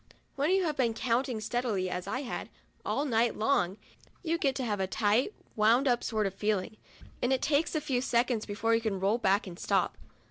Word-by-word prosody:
When 285 +3 +1
youVe 365 -5 +2
been 235 -4 +1
counting 245 0 0
steadily, 220 -4 -1
as 180 0 -4
I 255 - -2
had, 260 - -5 0.3
all 285 - -1
night 235 -3 +2
long, 215 -6 +1 0.5
you 335 0 0
get 270 -4 +1
to 265 - -2
have 210 -4 -1
a 190 - 0
tight, 215 - +2 0.2
wound 230 +6 +4
up 245 -1 +2
sort 215 -2 0
of 195 - -2
feeling, 210 0 -1 0.4
and 245 - +1
it 265 - +1
takes 300 +3 +1
a 310 - +1
few 265 -4 0
seconds 235 -2 +1
before 225 +2 0
you 230 - +3
can 210 -4 -2
roll 200 +5 +1
back 200 -1 +2
and 180 -2 -9
stop. - - 0
230 Hz, 205 wpm, -30 LUFS, 210-265 Hz, 0.5 s, wound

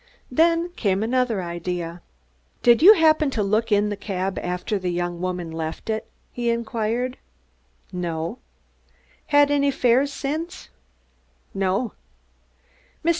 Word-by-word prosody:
Then 335 +5 +3
came 200 - 0
another 235 -4 0
idea. 170 0 -4 0.6
"Did 240 +1 +6
you 410 +6 +10
happen 310 -3 +4
to 225 -6 -1
look 215 +3 0
in 205 0 +3
the 205 - -2
cab 195 -1 -3
after 180 +3 -2
the 185 -1 -2
young 175 0 -2
woman 180 -2 -3
left 160 +6 -4
it?" 220 - -3 0.2
he 240 -1 -2
inquired. 235 +2 -1 0.7
"No." 170 +4 -3 0.9
"Had 290 -1 +4
any 285 -1 +3
fares 265 +1 +2
since?" 315 +6 -4 0.8
"No." 195 +4 0
220 Hz, 120 wpm, -23 LUFS, 180-265 Hz, 0.9 s, you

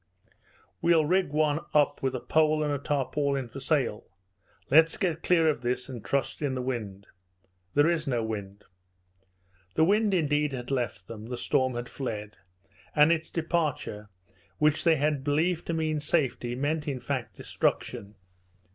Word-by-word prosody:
"We'll 165 -2 +4
rig 185 +1 +2
one 150 0 +1 0.2
up 145 -1 +3
with 130 -1 -1
a - - -2
pole 155 +2 +2
and 150 -1 0
a 140 - -2
tarpaulin 140 -1 -1
for 135 - -8
sail 135 -6 0 0.7
Let's 160 +3 +6
get 170 -3 -1
clear 165 -3 +3
of 150 -6 +1
this 125 +1 -2
and 120 -4 -7
trust 140 +2 -1
in 140 -3 -1
the 130 - -2
wind." 105 -6 -4 0.7
"There 145 +2 +5
is 165 -3 0
no 120 -4 0
wind." 100 -2 -5 1.1
The - - +4
wind, 205 +3 +3
indeed, 150 -3 +1
had 125 0 -5
left 120 -8 -2
them, 110 -1 -8
the 125 0 -4
storm 130 0 +1
had 120 0 -4
fled; 105 -7 -5 0.6
and 150 +2 +6
its 160 -1 0
departure, 155 - -2 0.5
which 150 0 +2
they 165 -1 +6
had 145 -2 0
believed 160 +4 0
to 170 - -1
mean 155 -1 0
safety, 135 -5 0
meant, 150 +3 -1
in 135 -3 -2
fact, 120 -7 -4
destruction. 110 -4 -2
145 Hz, 160 wpm, -28 LUFS, 125-155 Hz, 1.1 s, Let's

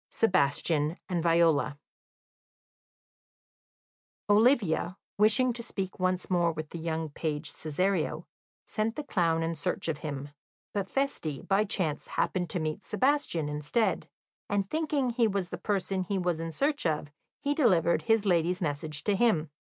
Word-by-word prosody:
Sebastian 155 -4 +1
and 175 -2 -1
Viola 165 -4 +3 2.5
Olivia, 205 - +3 0.2
wishing 235 +4 +4
to 235 - -3
speak 195 -6 -5
once 185 0 0
more 175 -2 +2
with 155 -1 -6
the 170 - -6
young 160 -1 -2
page 150 0 -3
Cesario, 175 +3 -1 0.4
sent 225 +1 -1
the 300 - -4
clown 165 - +1
in 165 +1 -1
search 155 - -2
of 155 -3 -2
him, 145 -2 -5 0.4
but 200 -2 -2
Feste, 270 - -2
by 200 +2 +3
chance, 165 -7 -1
happened 180 -3 -1
to 180 - -1
meet 155 +4 -3
Sebastian 220 - +1
instead, 150 +9 -1 0.4
and 200 -1 0
thinking 295 -2 0
he 235 -1 +3
was 195 -4 -2
the - - -5
person 195 -2 -1
he 200 +2 -1
was 175 -3 0
in 165 0 -4
search 280 - 0
of, 150 -2 -2 0.3
he 285 - 0
delivered 185 - +3
his 225 -2 +2
lady's 175 -1 +2
message 150 -2 -3
to 205 - +2
him. 180 -9 +2
180 Hz, 145 wpm, -29 LUFS, 160-215 Hz, 2.5 s, wishing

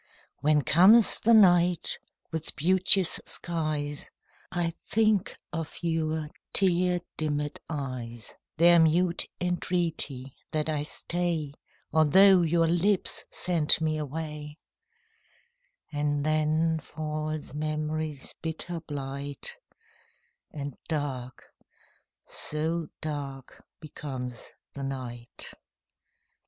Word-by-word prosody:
When 150 0 +3
comes 195 - +6
the 230 +1 +5
night 175 -4 +4 0.3
with 160 -1 -4
beauteous 185 +3 +4
skies, 155 -4 -2 0.4
I 175 -2 -1
think 215 -3 +1 0.2
of 165 -2 -4
your 160 -2 -1 0.2
tear 180 -2 +3 0.2
dimmed 150 -1 -2
eyes, 125 -6 -5 0.2
Their 170 +1 +7
mute 170 +2 +2
entreaty 170 -7 -1 0.2
that 155 0 0
I 150 -2 0
stay, 165 -1 -1 0.4
Although 185 +5 +6
your 165 0 +2
lips 175 +4 +4
sent 165 -5 +3
me 155 -1 0
away; 150 0 -6 1.4
And 145 0 -1
then 155 +1 +1
falls 155 -1 -5
memory's 155 -1 -3
bitter 165 +1 -4
blight, 140 -2 -4 0.9
And 145 -2 -6
dark 135 -5 -4 0.8
so 160 +2 -2
dark 140 -4 -6 0.2
becomes 130 -6 -7 0.2
the 140 - -7
night. 125 -3 -6
155 Hz, 90 wpm, -28 LUFS, 145-170 Hz, 1.4 s, Their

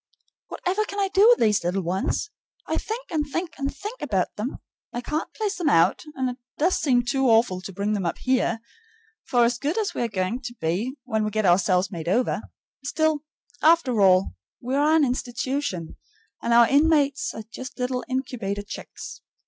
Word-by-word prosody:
Whatever 385 +4 -1
can 405 0 -5
I 390 -1 +1
do 400 +3 +5
with 485 - +7
these 210 -4 +2
little 180 +2 -1
ones? 190 - -1 0.3
I - - -1
think 475 +3 -5
and 310 -3 +1
think 335 +1 -2
and 275 0 -1
think 420 - -8
about 195 -10 -1
them. 225 +6 -4 0.3
I 240 - -3
can't 300 +6 -3
place 415 -3 -2
them 340 -4 +1
out, 170 - +3
and 260 -1 0
it 250 0 -4 0.2
does 350 +5 +2
seem 245 -4 +2
too 270 +1 +1
awful 225 -5 +3
to 195 - -7
bring 200 +3 -1
them 195 -4 -1
up - - -2
here; 255 -3 0 0.6
for 240 -2 +3
as 235 +1 0
good 295 +7 -1
as 430 -2 0
we - - -3
are 240 - +1
going 200 +3 -2
to 245 -2 -7
be 200 - -2
when 220 -4 -1
we 215 - 0
get 215 0 -1
ourselves 185 +1 +3
made 170 -3 -6
over, 240 +8 +1 0.4
still, 310 +2 +1 0.4
after 305 -9 +4
all, 185 - +4 0.3
we 250 +2 -4
are 295 +3 +4
an 310 -3 +5
institution, 245 - -3 0.4
and 235 - -1
our 235 0 +7
inmates 295 +6 +2
are 220 - -6
just 255 +4 -8
little 250 0 -1
incubator 230 -6 -3
chicks. 205 - -9
250 Hz, 190 wpm, -25 LUFS, 205-300 Hz, 0.6 s, with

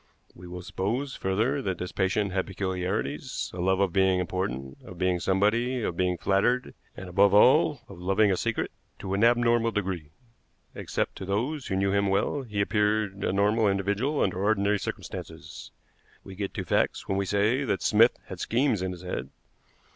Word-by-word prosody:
We 90 +1 -12
will 90 +1 -7
suppose, 120 +10 -2
further, 110 +9 0
that 95 -7 -2
this 90 - -5
patient 100 +1 0
had 95 -1 -1
peculiarities 95 -5 -3
a 90 - -7
love 95 +1 +2
of 95 -3 +1
being 95 -1 +3
important, 70 -8 -3
of 90 - -11
being 90 0 +1
somebody, 115 +7 +1
of 85 - -2
being 90 0 0
flattered, 100 +8 +1 0.2
and 95 - -7
above 100 +3 +4
all 105 - +5
of - - -12
loving 95 +3 +2
a - - +2
secret - - -2 0.3
to 95 -1 -5
an 100 +3 +1
abnormal 120 -1 +4
degree. 95 -8 -3 0.6
Except - - -3
to - - -6
those 125 +10 -2
who 95 - -1
knew 95 0 +1
him 100 0 +2
well, 100 +8 0
he 105 -6 -3
appeared 105 -1 0
a - - +1
normal 105 +3 +2
individual 100 +9 0
under 95 -1 0
ordinary 100 0 +2
circumstances. - - -7 0.5
We 95 - -10
get 100 0 -5
to - - -3
facts - - 0
when 95 0 0
we 100 - -1
say 105 +8 +2
that 105 -7 -1
Smith 115 +3 +4
had 95 - -8
schemes 120 -2 +1
in 95 0 -2
his 90 0 -11
head. 65 -7 -4
100 Hz, 180 wpm, -27 LUFS, 95-110 Hz, 0.6 s, all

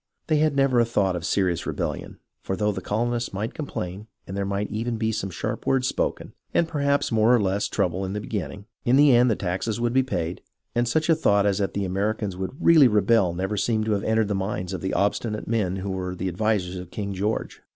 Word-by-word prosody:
They 155 - +2
had 150 -1 +2
never 135 -3 +3
a - - +6
thought 100 -5 +1
of 85 - -4
serious 90 -4 0
rebellion; - - -4 0.2
for 95 - -3
though 105 +3 +1
the 95 -2 -5
colonists 120 +4 -1
might 105 +5 -3
complain 105 - -5 0.2
and 95 - -7
there 100 0 -1
might 100 +1 -2
even 115 +2 -2
be 110 0 0
some 110 -3 -3
sharp 85 - -4
words 130 -1 +2
spoken, - - -2 0.2
and 170 - +3
perhaps 140 -4 0
more 115 +2 +4
or - - +3
less 100 0 0
trouble 90 +2 -1
in 95 0 -3
the 105 - -2
beginning, 100 -1 -5 0.2
in 120 - +3
the 140 -2 +6
end 125 +1 +5
the 110 - +2
taxes 95 +5 -2
would 120 0 0
be 130 - +5
paid, 90 -9 -3 0.3
and 120 0 +1
such 160 +6 +1
a 165 - +5
thought 100 -9 +3
as 100 -1 +1
that 100 - -1
the 100 -1 0
Americans 100 +1 -1
would 95 +6 -5
really 160 -5 +7
rebel 105 -3 +3
never 95 +4 -2
seemed 110 +1 +1
to 110 - -1
have 100 -1 +1
entered 110 -1 +2
the - - +1
minds 95 -1 -3
of 95 - -4
the 95 - -2
obstinate 105 +2 -1
men 105 -5 0
who 95 +1 -4
were 90 -1 -3
the 95 +1 -2
advisers 95 -1 -1
of 90 -1 -8
King 100 0 -4
George. 105 +4 -2
105 Hz, 235 wpm, -25 LUFS, 95-120 Hz, 0.3 s, really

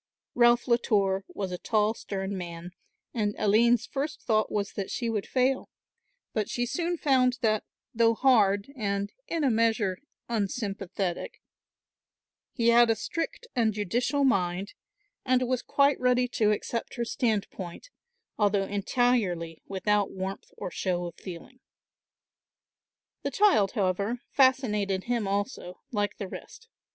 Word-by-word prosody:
Ralph 240 0 +4
Latour 200 -5 +2
was 195 -2 -5
a 180 - -4
tall 215 -1 +1
stern 195 -2 -4
man 175 -1 -6 0.4
and 210 -3 -1
Aline's 225 +3 +4
first 290 +3 -4
thought 215 -1 +1
was 200 -1 -1
that 195 -2 -4
she 235 -2 -2
would 210 -3 -2
fail, 260 +1 +1 0.6
but 215 -2 -1
she 245 - -1
soon 345 +6 -1
found 255 -4 +3
that, 215 -2 +2 0.3
though 230 -1 +3
hard 215 -2 +3
and 200 -4 -2
in 330 -2 -1
a 270 - +3
measure 220 -4 +1 0.3
unsympathetic, 200 -4 -3 1.1
he 235 -3 +2
had 235 0 +6
a 225 - +4
strict 330 - -4
and 225 -4 +2
judicial 240 +8 0
mind, 190 -5 +1 0.5
and 255 -1 +2
was 255 -1 0
quite 280 0 +2
ready 250 0 +3
to 215 -3 +2
accept 225 +2 -2
her 235 - -2
standpoint, 210 - -3 0.5
although 205 -2 +3
entirely 200 -6 0
without 205 +1 +1
warmth 190 +1 -5
or - - -5
show 175 -1 -1
of 170 - -6
feeling. 190 +8 -10 1.6
The - - -2
child, 385 - +3
however, 200 +2 0
fascinated 210 -8 +2
him 235 -4 -1
also, 200 -2 -3
like 205 -3 -1
the 200 - -4
rest. 450 - -11
215 Hz, 135 wpm, -28 LUFS, 195-245 Hz, 1.6 s, had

